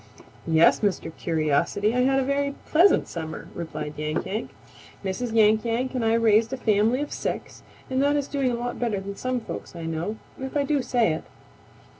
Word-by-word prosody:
"Yes, 160 0 +5
Mr. 185 -5 -1
Curiosity, 170 +6 +1
I 250 - +1
had 270 +2 +3
a - - +1
very 280 +1 0
pleasant 350 +5 +4
summer," 160 -2 -6
replied 155 -3 -5
Yank 155 +1 -2
Yank. 215 +4 -3 0.6
"Mrs. 210 +6 -2
Yank 220 -1 +4
Yank 240 +3 -1
and 250 -3 -1
I 225 0 +3
raised 225 0 +4
a 265 - -2
family 220 +3 +2
of 295 - -4
six - - -4 0.3
and 260 0 0
that 285 +1 +3
is 285 -1 0
doing 275 -3 0
a - - -1
lot 240 +1 -4
better 230 -5 0
than 200 +1 -6
some 255 +3 -2
folks 220 - -7
I 170 - -6
know, 165 +6 -2 0.2
if 265 +2 -3
I 285 - +2
do 285 0 +1
say 240 -9 +2
it. 155 - -5
225 Hz, 195 wpm, -25 LUFS, 180-260 Hz, 0.6 s, Yes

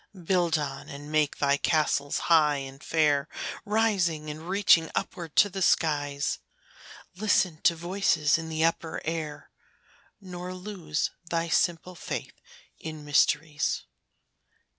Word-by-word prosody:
Build 170 -2 +2
on, 145 -2 -5
and 145 +1 -9
make 155 -2 +1
thy 140 0 +2
castles 145 -2 +1
high 155 -3 +5
and 135 0 -7
fair, 150 -3 +2 0.4
Rising 190 -8 +1
and 160 +3 -9
reaching 185 -4 +4
upward 165 -4 -4
to 205 - +6
the 195 -1 -6
skies; 145 -5 +1 0.8
Listen 185 -5 +1
to 170 - +4
voices 165 -3 +1
in 160 0 -6
the 160 0 +1
upper 165 -1 -1
air, 155 -2 -4 0.7
Nor 180 -2 -7
lose 180 -5 -3 0.2
thy 170 0 -1
simple 175 +2 +1
faith 170 - -5 0.5
in 155 -2 -7
mysteries. 150 +1 +1
160 Hz, 120 wpm, -27 LUFS, 150-175 Hz, 0.8 s, to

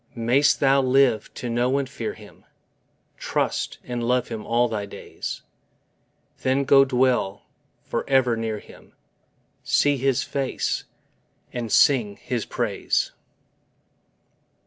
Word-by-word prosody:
May'st 125 +5 +3
thou 135 0 +4
live 130 -3 +2
to 125 - -5
know 120 +3 +1
and 140 -1 -1
fear 115 -4 -5
Him, 105 -2 -16 0.7
Trust - - -2
and 120 -1 -4
love 125 +1 +1
Him 110 -2 -6
all 120 +1 +3
thy 105 -3 -4
days: - - -7 1.0
Then 130 +1 +1
go 135 0 +6
dwell 125 -6 +1 0.4
for - - -3
ever 130 -3 +3
near 110 -1 -3
Him, - - -15 0.7
See 145 -1 +2
His 135 -1 +1
face, 135 -2 -2 0.7
and 120 -3 -4
sing 115 -7 +4
His 120 -3 -4
praise! - - -1
125 Hz, 120 wpm, -24 LUFS, 115-135 Hz, 1.0 s, go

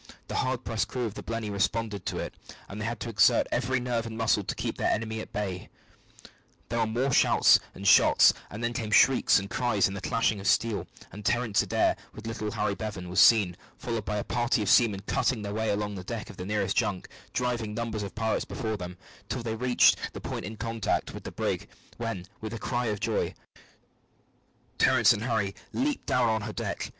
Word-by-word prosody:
The - - -4
hard 130 -1 -2
pressed 115 -2 -1
crew 125 -2 -3
of 110 - -4
the - - -7
Blenny 115 -2 -4
responded 100 0 -1
to - - -2
it, - - -4 0.3
but 100 - -8
they 110 - -3
had 120 +1 -3
to 120 - -4
exert 115 - +4
every 130 +1 0
nerve 120 -2 -2
and 110 -1 -7
muscle 115 -1 +2
to - - -4
keep - - -3
the - - +2
enemy 110 0 -2
at - - -8
bay. 95 -4 -4 1.0
There 115 - -1
were 115 - +2
more 125 +5 0
shouts - - +5 0.2
and 100 - -4
shots, - - +7 0.2
and 110 +3 -7
then 120 0 0
came 110 -2 -3
shrieks 130 +4 +5
and 100 -1 -2
cries 110 -3 +1
and 95 - -5
the 100 - -6
clashing 110 -2 +1
of 95 - -4
steel, 105 +3 +1 0.2
and 105 - -9
Terence 115 -1 +2
Adair, - - +1 0.2
with 110 - -10
little 115 -1 -3
Harry 105 -2 -1
Bevan, 100 -2 -5
was 90 +2 0
seen, 105 -8 +6 0.2
followed 115 -3 -3
by 105 - -2
a 105 - -1
party 120 -2 0
of 100 - -1
seamen, 105 -5 +4
cutting 115 -2 0
their 100 0 -4
way 110 +1 -1
along 105 0 -1
the 95 -2 -6
deck 110 +3 -5
of - - -16
the 90 - -6
nearest 105 -2 0
junk, 105 -5 0 0.2
driving 120 -4 -2
numbers 115 -2 -3
of 100 - -6
pirates 110 0 0
before 110 -2 -4
them, 90 -1 -7 0.3
till 120 +1 -3
they 115 -1 -2
reached 125 +2 +4 0.2
the - - -6
point - - -5
in 110 +2 -7
contact 115 -1 -2
with - - -9
the - - -5
brig, - - -2 0.3
when, 115 -6 -4
with 110 +1 -5
a - - -4
cry 120 +2 -2
of 105 -2 -2
joy, - - -1 1.4
Terence - - +5
and 105 - -4
Harry 110 -5 0 0.2
leaped 285 +1 -1
down 125 -1 +3
on 110 -1 +1
her - - -5
deck. - - -4
110 Hz, 215 wpm, -28 LUFS, 100-115 Hz, 1.4 s, shots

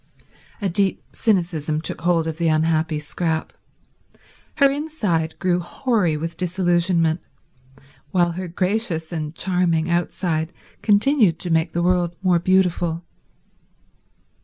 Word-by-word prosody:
A - - +2
deep 190 +1 +1
cynicism 170 -7 0
took 165 - -5
hold 170 -1 +2
of 160 0 -4
the 170 - +1
unhappy 160 0 +1
Scrap. 160 +2 -2 1.0
Her 280 -2 +5
inside 215 - -2
grew 180 -1 +1
hoary 180 - 0
with 165 +2 -5
disillusionment, 175 -2 +1 0.9
while 175 -2 +2
her 180 +2 -5
gracious 180 -2 -1
and 155 -2 -4
charming 175 -3 +1
outside 170 -1 -1 0.3
continued 210 - +3
to 175 0 -4
make 160 0 +1
the 170 - 0
world 175 -1 +1
more 180 -2 +3
beautiful. 175 -2 +1
175 Hz, 115 wpm, -22 LUFS, 160-185 Hz, 1.0 s, Her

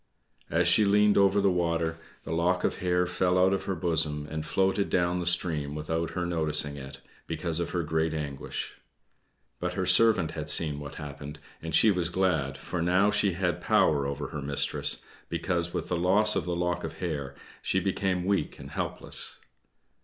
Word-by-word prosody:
As 85 +2 +2
she 90 +5 +5
leaned 105 0 +4
over 100 0 +4
the 100 -1 +3
water, 85 -2 -1 0.2
the 70 - -7
lock 90 +2 +1
of - - 0
hair 90 0 +1
fell 90 +1 0
out 95 +1 +4
of 95 - -2
her 95 - -2
bosom 80 -3 -1
and 80 0 -3
floated 95 +4 0
down 90 0 +1
the 85 - -3
stream 80 -5 +1
without 80 +2 -2
her 90 - 0
noticing 75 -4 +1
it, 70 -1 -9 0.3
because 85 0 -3
of 85 - -2
her 90 -1 -2
great 80 +1 0
anguish. 75 -3 -5 0.8
But 90 0 -2
her 95 0 -2
servant 105 -6 +4
had 75 -1 -4
seen 75 -2 +2
what 70 -1 -8
happened, 75 0 -8 0.2
and 80 0 -3
she 110 - +6
was 90 -3 -1
glad, 80 -8 0
for 90 - -4
now 90 +4 +3
she 105 -2 +2
had 90 0 -1
power 70 -3 +2
over 70 +1 -4
her 75 -3 -5
mistress, 70 0 +2 0.3
because 85 -2 -2
with - - -4
the 90 - 0
loss 95 +5 +3
of - - -1
the 90 -1 -2
lock 90 0 -1
of - - -5
hair, 70 -6 -4 0.3
she 95 - +1
became 95 -1 -1
weak 95 -6 -1
and - - -10
helpless. - - -4
85 Hz, 185 wpm, -28 LUFS, 75-90 Hz, 0.8 s, she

